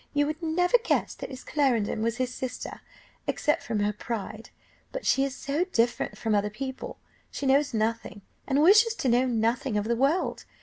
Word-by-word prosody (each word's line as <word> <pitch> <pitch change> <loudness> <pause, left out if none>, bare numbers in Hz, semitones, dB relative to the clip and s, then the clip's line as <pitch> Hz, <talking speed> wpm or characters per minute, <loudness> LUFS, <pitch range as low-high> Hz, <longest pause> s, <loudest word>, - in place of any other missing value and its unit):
you 290 0 +3
would 310 +3 -4
never 355 +7 +3
guess 465 - 0
that - - -7
Miss 260 -2 -9
Clarendon 245 -8 +1
was 230 +1 0
his 255 -1 -1
sister, 255 0 -6 0.5
except 300 - +1
from 220 -3 -2
her 205 +1 +1
pride. 215 0 -6 0.4
But - - -5
she 270 +2 +3
is 275 -1 -2
so 290 +4 -1
different 240 -10 0
from 220 -2 -1
other 205 0 +2
people; 260 +5 -6 0.3
she 280 - -5
knows 280 +2 +3
nothing, 220 -3 -2 0.2
and 280 +2 +3
wishes 435 +6 +6
to 265 - -1
know 245 +2 +3
nothing 235 +1 0
of 205 - -1
the 235 +1 +1
world. 275 +9 +1
260 Hz, 185 wpm, -27 LUFS, 225-295 Hz, 0.5 s, wishes